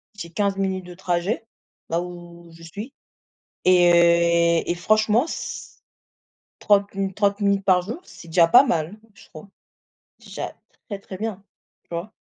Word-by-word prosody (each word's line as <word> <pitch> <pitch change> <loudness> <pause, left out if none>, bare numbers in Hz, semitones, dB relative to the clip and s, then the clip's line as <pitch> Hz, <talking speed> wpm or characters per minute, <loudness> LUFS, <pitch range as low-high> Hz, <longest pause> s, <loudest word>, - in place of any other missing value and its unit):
j'ai 190 -5 -8
15 200 +3 -1
minutes 190 -1 -2
de 180 - -10
trajet, 180 +4 -2 0.4
là 165 +1 0
où 175 -1 -10
je 165 0 -15
suis 205 - -8 0.7
et 170 -1 +4
et - - -1
franchement 215 - +2
c - - -7 0.8
30 200 -1 +2
mi 195 0 -2
30 200 +1 +1
minutes 200 -1 +1
par 185 -2 +4
jour, 230 - -6
c'est 170 - -14
déjà 165 +1 +4
pas 245 - +7
mal, 170 - -1 0.2
je - - -17
trouve. 155 +5 -12 0.7
Déjà - - -7 0.4
très 200 -2 -5
très 190 -1 -9
bien 205 -1 -5 0.4
tu - - -46
vois? 180 +6 -5
185 Hz, 150 wpm, -23 LUFS, 170-205 Hz, 0.8 s, pas